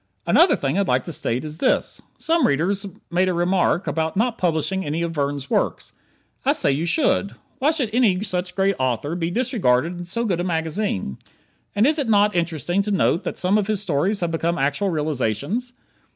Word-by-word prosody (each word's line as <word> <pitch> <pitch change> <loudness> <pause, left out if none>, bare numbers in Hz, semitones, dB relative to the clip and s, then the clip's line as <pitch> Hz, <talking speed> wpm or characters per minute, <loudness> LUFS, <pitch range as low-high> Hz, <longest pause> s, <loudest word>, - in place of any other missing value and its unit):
Another - - +5
thing 140 +8 -1
I'd 200 - +1
like - - +2
to 170 - -6
state 125 +1 -2
is 155 +1 -6
this: - - +1 0.2
Some 330 0 +2
reader 165 +8 +1 0.4
made 185 +2 +2
a 180 - -1
remark 175 +1 +1
about 160 +2 -1
not 235 +2 +1
publishing 180 +2 0
any 160 +2 -2
of 170 - -2
Verne's 140 -2 -2
works. - - -1 0.5
I - - +3
say - - +2
you 155 +5 -1
should. 230 - +1 0.2
Why 285 +3 +3
should 285 -9 0
any 210 -6 +3
such 180 -3 -3
great 195 0 +2
author 130 +4 -1
be 170 -1 -2
disregarded 180 - +1
in 175 - -6
so 230 +7 -2
good 180 -6 0
a - - 0
magazine? 160 - -2 0.6
And 205 +3 +4
is 305 +3 +2
it 270 -5 -1
not 210 -1 +4
interesting 170 +2 0
to 205 - -3
note 190 -4 +2
that - - -3
some 190 +3 +2
of 200 - -2
his 215 -2 0
stories 185 +4 0
have 170 -1 -1
become 170 +1 -1
actual 145 +7 0
realizations? 155 - -2
175 Hz, 195 wpm, -22 LUFS, 155-205 Hz, 0.6 s, Another